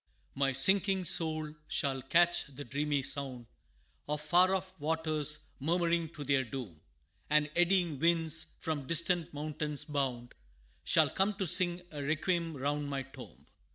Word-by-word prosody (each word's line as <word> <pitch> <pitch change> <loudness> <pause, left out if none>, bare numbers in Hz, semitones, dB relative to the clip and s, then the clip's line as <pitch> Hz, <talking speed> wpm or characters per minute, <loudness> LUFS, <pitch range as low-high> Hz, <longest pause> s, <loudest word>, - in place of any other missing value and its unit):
My 135 0 +1
sinking 190 +7 +4
soul 155 -3 0
shall 135 -3 -1
catch 175 +6 +2
the 140 +1 -9
dreamy 145 +1 -1
sound 130 -3 -4 0.6
Of 150 0 -1
far 180 +5 +4
off 190 0 -4
waters, 155 -1 0
murmuring 170 +2 +1
to 150 - -6
their 135 -1 +2
doom, 115 - -7 0.5
And 150 0 +3
eddying 175 -4 +2
winds, 165 0 +1
from 145 -4 -3
distant 170 +1 +1
mountains 150 0 -3
bound, 130 -5 -2 0.5
Shall - - +3
come 195 +2 +1
to 195 -1 -2
sing 175 +1 +2
a 150 -2 -6
requiem 160 +2 -1
round 145 +2 -2
my 135 -1 -2
tomb. 135 -1 -13
150 Hz, 140 wpm, -32 LUFS, 140-170 Hz, 0.6 s, sinking